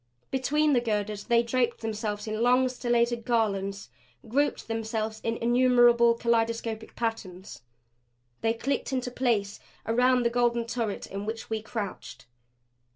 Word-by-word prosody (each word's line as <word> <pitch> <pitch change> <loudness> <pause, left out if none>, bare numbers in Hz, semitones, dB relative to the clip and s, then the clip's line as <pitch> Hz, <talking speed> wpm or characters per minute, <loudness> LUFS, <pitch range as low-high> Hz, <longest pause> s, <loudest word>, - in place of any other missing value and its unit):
Between 295 +3 +2
the 245 - +3
girders 210 -2 -2
they 235 -1 +3
draped 240 0 0
themselves 210 -2 -3
in 215 0 -3
long, 250 +2 +4
stellated 240 -1 0
garlands; 200 - -1 0.4
grouped 285 +6 0
themselves 220 -1 -3
in 230 0 -1
innumerable, 240 -1 +4
kaleidoscopic 230 -1 -1
patterns. 195 - -5 0.8
They 225 0 +1
clicked 275 +4 -2
into 255 -1 -2
place 230 -6 0 0.3
around 250 +2 +3
the 235 - +1
golden 240 -1 +1
turret 230 -3 -3
in 200 +2 -6
which 225 0 -5
we 220 -1 -1
crouched. 215 -2 -6
230 Hz, 130 wpm, -27 LUFS, 220-245 Hz, 0.8 s, long